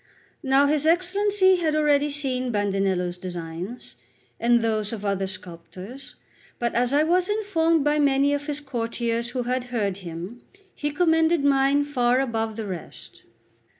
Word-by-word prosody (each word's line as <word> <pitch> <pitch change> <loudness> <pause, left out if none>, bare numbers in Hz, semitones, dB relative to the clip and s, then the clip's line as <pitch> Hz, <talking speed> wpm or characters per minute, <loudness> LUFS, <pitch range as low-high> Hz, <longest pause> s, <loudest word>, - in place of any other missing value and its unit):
Now 270 +1 +3
his 300 +1 +1
Excellency 375 +2 +3
had 320 -3 0
already 295 -1 +3
seen 260 -3 -1
Bandinello's 195 -4 -1
designs, 175 - -7 0.4
and 235 0 +3
those 215 -2 -1
of 210 -3 -6
other 195 -1 -1
sculptors; 190 +8 -9 0.4
but, 235 -1 -1
as 245 +1 +1
I 290 +2 +3
was 355 +4 +2
informed 335 -7 +1
by 295 +1 +2
many 280 0 +3
of 290 +1 -3
his 295 0 -1
courtiers 235 -3 -2
who 250 0 -3
had 250 +1 -2
heard 210 -6 -2
him, 180 +5 -8 0.3
he 295 - -3
commended 325 0 +2
mine 275 +1 +3
far 250 -3 +1
above 225 -4 -2
the 220 -1 -5
rest. 185 -4 -9
255 Hz, 150 wpm, -24 LUFS, 210-295 Hz, 0.4 s, Now